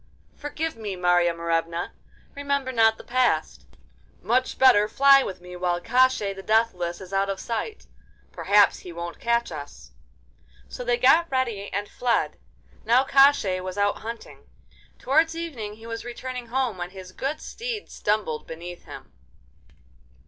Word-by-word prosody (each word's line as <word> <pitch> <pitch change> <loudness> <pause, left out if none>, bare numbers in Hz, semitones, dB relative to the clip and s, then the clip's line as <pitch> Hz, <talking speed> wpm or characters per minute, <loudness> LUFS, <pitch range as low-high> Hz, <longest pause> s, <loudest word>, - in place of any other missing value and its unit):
'Forgive 315 +2 -4
me, 210 -4 -5
Marya 175 -1 +3
Morevna! 170 0 -2 0.4
Remember 280 -2 -1
not 225 -2 +4
the - - -12
past; 255 0 0 0.5
much 255 +3 0
better 240 -6 +6
fly 275 +3 +6
with 190 -7 -5
me 180 0 -10
while 175 -1 -1
Koshchei 250 -1 +2
the 195 - -8
Deathless 190 -5 0
is 190 +1 -10
out 195 0 +1
of 195 -1 -3
sight. 240 - -4 0.5
Perhaps 205 0 +3
he 180 - -10
won't 170 0 -7
catch 235 -2 0
us.' 145 -2 -9 0.8
So - - -7
they 240 0 +1
got 275 +7 +4
ready 235 -7 -2
and 205 +1 -3
fled. 240 +1 -1 0.4
Now 245 +3 +4
Koshchei 270 -9 +4
was 185 +1 -6
out 205 0 +1
hunting. 230 +1 -9 0.5
Towards 320 +4 +2
evening 255 -12 -5
he 225 +1 -14
was 230 0 -6
returning 250 0 -6
home, 245 -5 -1
when 175 0 -4
his 185 -1 -11
good 275 +10 -3
steed 460 -2 -6
stumbled 205 -7 -2
beneath 175 +2 -9
him. - - -11
225 Hz, 150 wpm, -25 LUFS, 185-260 Hz, 0.8 s, better